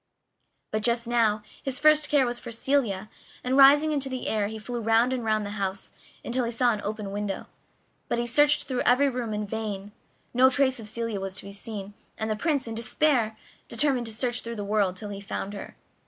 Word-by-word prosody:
But 215 Hz, -, -1 dB
just 235 Hz, +1 st, +2 dB
now 225 Hz, -3 st, +2 dB, 0.2 s
his 265 Hz, -2 st, -3 dB
first 305 Hz, 0 st, +5 dB
care 285 Hz, -3 st, +4 dB
was 240 Hz, 0 st, -2 dB
for 240 Hz, -, -8 dB
Celia, 230 Hz, -5 st, 0 dB, 0.4 s
and 255 Hz, +1 st, 0 dB
rising 285 Hz, +3 st, +7 dB
into 280 Hz, -2 st, -1 dB
the 260 Hz, -1 st, -4 dB
air 210 Hz, -2 st, 0 dB
he 220 Hz, +1 st, -6 dB
flew 240 Hz, +2 st, -5 dB
round 225 Hz, +3 st, +3 dB
and 250 Hz, -2 st, -2 dB
round 215 Hz, -1 st, +1 dB
the 205 Hz, -, -5 dB
house, 195 Hz, 0 st, -3 dB, 0.3 s
until 250 Hz, +1 st, 0 dB
he 230 Hz, -, -1 dB
saw 240 Hz, 0 st, +2 dB
an 210 Hz, -, -4 dB
open 210 Hz, -1 st, -4 dB
window; 205 Hz, -1 st, -3 dB, 0.6 s
but -, -, -1 dB
he 240 Hz, -, 0 dB
searched 295 Hz, +5 st, +4 dB
through 255 Hz, -2 st, -2 dB
every 275 Hz, +3 st, +4 dB
room 245 Hz, -3 st, -3 dB
in 210 Hz, 0 st, -2 dB
vain. 205 Hz, -2 st, -4 dB, 0.4 s
No 255 Hz, +2 st, +6 dB
trace 260 Hz, -1 st, +2 dB
of 220 Hz, -, -7 dB
Celia 230 Hz, -1 st, -3 dB
was 190 Hz, -1 st, -5 dB
to -, -, -4 dB
be 200 Hz, -, -9 dB
seen, 205 Hz, -1 st, -7 dB, 0.2 s
and 220 Hz, 0 st, -2 dB
the -, -, +1 dB
Prince, 280 Hz, 0 st, 0 dB
in 225 Hz, -, -4 dB
despair, 230 Hz, -1 st, +1 dB, 0.3 s
determined 265 Hz, -5 st, +1 dB
to -, -, -5 dB
search 240 Hz, +2 st, -1 dB
through 235 Hz, 0 st, -6 dB
the 205 Hz, -, -4 dB
world 200 Hz, -3 st, +1 dB
till 205 Hz, +2 st, -6 dB
he 200 Hz, -1 st, -6 dB
found 200 Hz, 0 st, -5 dB
her. 200 Hz, -, -8 dB
230 Hz, 215 wpm, -26 LUFS, 210-255 Hz, 0.6 s, rising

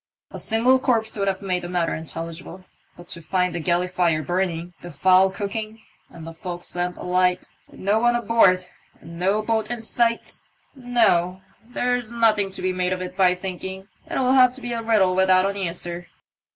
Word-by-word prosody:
"A -, -, -7 dB
single 240 Hz, +4 st, +3 dB
corpse 225 Hz, -4 st, +1 dB
would 200 Hz, -2 st, -1 dB
have 195 Hz, 0 st, -1 dB
made 180 Hz, -2 st, -1 dB
the 175 Hz, -, -7 dB
matter 175 Hz, -2 st, 0 dB
intelligible; 165 Hz, +3 st, -6 dB, 0.3 s
but 175 Hz, -, -13 dB
to 170 Hz, -, -7 dB
find 180 Hz, +2 st, 0 dB
the 175 Hz, -, -2 dB
galley 175 Hz, +2 st, +1 dB
fire 175 Hz, -4 st, +1 dB
burning, 175 Hz, +1 st, -2 dB
the 175 Hz, -, -9 dB
fowl 185 Hz, +5 st, +4 dB
cooking, 215 Hz, +3 st, -5 dB, 0.3 s
the 165 Hz, 0 st, -10 dB
fo'ksle 175 Hz, +1 st, -7 dB
lamp 180 Hz, 0 st, -2 dB
alight, 180 Hz, 0 st, 0 dB, 0.2 s
and -, -, -15 dB
no 205 Hz, +3 st, +2 dB
one 240 Hz, +1 st, +3 dB
aboard, 205 Hz, -6 st, +3 dB, 0.3 s
and 170 Hz, +1 st, -11 dB
no 195 Hz, +4 st, +1 dB
boat 220 Hz, 0 st, -1 dB
in 240 Hz, -2 st, -4 dB
sight 230 Hz, 0 st, 0 dB, 0.3 s
— -, -, -39 dB, 0.2 s
No! 180 Hz, -3 st, +3 dB, 0.2 s
there's 245 Hz, 0 st, -2 dB
nothing 220 Hz, -4 st, +2 dB
to 190 Hz, -, -8 dB
be 185 Hz, 0 st, 0 dB
made 180 Hz, 0 st, 0 dB
of 185 Hz, -, -4 dB
it 180 Hz, -, -7 dB
by 180 Hz, -2 st, +4 dB
thinking. 190 Hz, +1 st, -7 dB, 0.2 s
It'll 255 Hz, -1 st, +1 dB
have 255 Hz, -2 st, +5 dB
to 265 Hz, -, -10 dB
be 240 Hz, -1 st, -4 dB
a 230 Hz, -, -2 dB
riddle 215 Hz, -5 st, +3 dB
without 185 Hz, 0 st, +4 dB
an 200 Hz, -, -3 dB
answer." 175 Hz, -2 st, -4 dB
185 Hz, 190 wpm, -23 LUFS, 180-220 Hz, 0.3 s, have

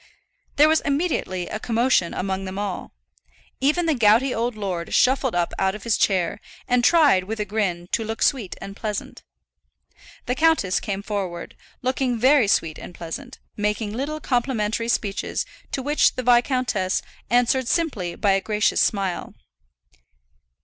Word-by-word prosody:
There 300 Hz, +2 st, +6 dB
was 315 Hz, +1 st, +3 dB
immediately 280 Hz, -, -1 dB
a 215 Hz, -, -4 dB
commotion 230 Hz, -6 st, +1 dB
among 190 Hz, 0 st, -3 dB
them 190 Hz, 0 st, -6 dB
all. 200 Hz, -2 st, -4 dB, 0.7 s
Even 305 Hz, +6 st, +2 dB
the 320 Hz, -, +2 dB
gouty 235 Hz, +2 st, +4 dB
old 235 Hz, +1 st, -1 dB
lord 185 Hz, -5 st, -3 dB
shuffled 260 Hz, -2 st, +3 dB
up 175 Hz, -1 st, 0 dB
out 190 Hz, +1 st, +1 dB
of 210 Hz, -, -9 dB
his 230 Hz, -2 st, +1 dB
chair, 185 Hz, 0 st, +1 dB, 0.3 s
and 245 Hz, 0 st, +2 dB
tried, 290 Hz, -, +5 dB
with 220 Hz, +2 st, -5 dB
a 210 Hz, -, -1 dB
grin, 190 Hz, -4 st, -2 dB
to 225 Hz, -, 0 dB
look 225 Hz, +1 st, -3 dB
sweet 235 Hz, -, 0 dB
and 195 Hz, +2 st, -8 dB
pleasant. 210 Hz, -1 st, -5 dB, 1.0 s
The 250 Hz, -, 0 dB
countess 310 Hz, -, +2 dB
came 200 Hz, -2 st, -4 dB
forward, 190 Hz, -5 st, -4 dB, 0.3 s
looking 255 Hz, -1 st, 0 dB
very 260 Hz, 0 st, +4 dB
sweet 165 Hz, -5 st, +1 dB
and 175 Hz, -, -10 dB
pleasant, 245 Hz, +11 st, -7 dB, 0.2 s
making 210 Hz, 0 st, -1 dB
little 285 Hz, +6 st, -3 dB
complimentary 235 Hz, -4 st, -1 dB
speeches, 205 Hz, -4 st, -1 dB, 0.3 s
to 265 Hz, -, -3 dB
which 295 Hz, +3 st, +3 dB
the 255 Hz, -, -3 dB
viscountess 245 Hz, -6 st, +2 dB, 0.3 s
answered 245 Hz, +1 st, +2 dB
simply 230 Hz, -, -1 dB
by 205 Hz, -, +2 dB
a 195 Hz, 0 st, +2 dB
gracious 210 Hz, 0 st, +1 dB
smile. 195 Hz, -4 st, -1 dB
220 Hz, 150 wpm, -23 LUFS, 195-255 Hz, 1.0 s, There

